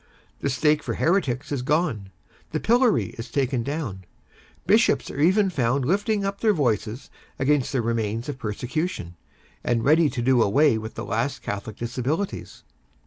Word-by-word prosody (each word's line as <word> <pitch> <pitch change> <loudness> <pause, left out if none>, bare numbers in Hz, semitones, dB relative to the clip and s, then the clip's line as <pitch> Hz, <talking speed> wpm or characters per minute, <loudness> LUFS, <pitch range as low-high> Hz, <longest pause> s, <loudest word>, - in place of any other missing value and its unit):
The - - -1
stake 150 +4 +2
for - - -3
heretics 150 -8 0
is 140 -3 -1
gone; 140 - 0 0.4
the 155 - 0
pillory 240 +3 +2
is 115 - -6
taken 130 -3 0
down; 130 -8 -4 0.6
Bishops - - +3
are - - -7
even 190 +4 +4
found 130 -3 0
lifting 205 - +1
up 200 0 -3
their 220 -2 +4
voices 120 - -1 0.3
against 135 -1 +1
the 130 -4 0
remains 115 0 -1
of 145 -3 -5
persecution, 125 - -3 0.5
and 115 -2 0
ready 155 +2 +5
to 125 -4 -3
do 130 -1 +4
away 120 +3 +3
with 110 +1 -8
the - - -5
last 125 +4 -2
Catholic 100 +1 -5
Disabilities. 130 +11 -3
135 Hz, 155 wpm, -24 LUFS, 115-160 Hz, 0.6 s, ready